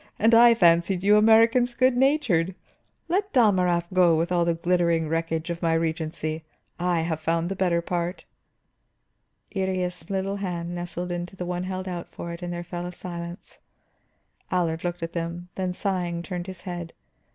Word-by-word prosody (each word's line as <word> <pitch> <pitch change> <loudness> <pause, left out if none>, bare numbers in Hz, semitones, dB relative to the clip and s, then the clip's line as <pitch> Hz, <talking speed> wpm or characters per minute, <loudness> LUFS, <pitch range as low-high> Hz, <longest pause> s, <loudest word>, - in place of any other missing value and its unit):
"And 225 +2 +3
I 235 0 +8
fancied 175 -1 +3
you 205 +1 +5
Americans 230 +3 +5
good 255 0 +3
natured! 245 - +2 0.5
Let 395 +4 0
Dalmorov 185 - +3
go 175 -3 +5
with 170 +2 -1
all 175 -1 +2
the 170 -1 +1
glittering 170 -1 +1
wreckage 165 +1 -2
of 170 - -5
my 165 -1 +2
regency. 160 -1 -2 0.4
I 175 -1 +1
have 160 -1 -2
found 165 +2 0
the 195 - -3
better 175 -3 +1
part." 175 +1 -3 1.3
Iría's 180 -3 -2
little 195 0 -1
hand 175 -3 -4
nestled 175 0 -4
into 175 +1 -4
the 180 - -5
one 180 0 -3
held 185 0 -4
out 175 -2 -5
for 170 0 -7
it, 170 - -9
and 175 0 -4
there 175 0 -4
fell 175 0 -5
a - - -6
silence. 175 0 -8 0.9
Allard 165 -3 0
looked 175 -1 -3
at 165 - -4
them, 170 +1 -4
then 185 -1 -2
sighing 180 -3 -2
turned 180 -1 -5
his 185 -2 -7
head. 175 -2 -6
175 Hz, 170 wpm, -25 LUFS, 170-190 Hz, 1.3 s, I